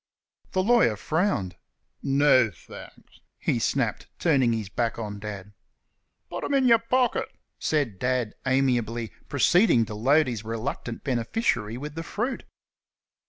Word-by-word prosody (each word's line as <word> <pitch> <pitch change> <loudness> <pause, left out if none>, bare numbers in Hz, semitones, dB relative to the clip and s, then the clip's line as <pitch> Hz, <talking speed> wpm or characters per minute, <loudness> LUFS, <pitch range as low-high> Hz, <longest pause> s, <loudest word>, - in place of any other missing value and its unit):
The 185 - +2
lawyer 230 - +4
frowned. 110 - -1 0.4
"No, 135 -3 +4
thanks," 100 - -14 0.2
he - - 0
snapped, - - -1
turning 135 -8 +3
his 110 -3 -2
back 115 +3 -2
on 105 -3 -5
Dad. 105 -1 -7 0.7
"Put - - -6
'em 285 - 0
in 265 -2 +3
yer 230 -2 +6
pocket," 245 +2 +1 0.3
said 140 -11 -1
Dad, 125 -3 0
amiably, 120 -4 0 0.2
proceeding 140 - +4
to 110 - -7
load 140 +9 +3
his 115 -4 -4
reluctant 115 +1 -4
beneficiary 120 - -1
with 145 +3 -6
the 165 - -5
fruit. 235 +10 -3
125 Hz, 130 wpm, -26 LUFS, 110-160 Hz, 0.7 s, yer